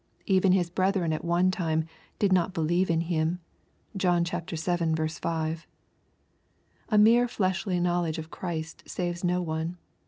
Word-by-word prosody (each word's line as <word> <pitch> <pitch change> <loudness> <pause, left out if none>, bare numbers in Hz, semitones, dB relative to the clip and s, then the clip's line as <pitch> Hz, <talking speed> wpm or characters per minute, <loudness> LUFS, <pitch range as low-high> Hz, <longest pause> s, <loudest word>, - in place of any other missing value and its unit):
Even 190 -1 +3
His 175 -2 +1
brethren 185 -3 +1
at 155 - -3
one 175 +2 +2
time 160 -4 0 0.2
" - - -31
did 200 -2 +2
not 180 0 +1
believe 170 +3 +1
in 165 -1 +2
him." 165 0 0 0.6
(John 180 -3 +2
vii. 170 -1 -4 0.5
5.) 160 0 -3 1.2
A 215 - +3
mere 230 +3 +6
fleshly 185 -3 -1
knowledge 175 -2 0
of 160 0 -7
Christ 165 -3 -5
saves 175 -1 -3
no 180 0 +1
one. 160 +2 -3
175 Hz, 145 wpm, -27 LUFS, 165-185 Hz, 1.2 s, mere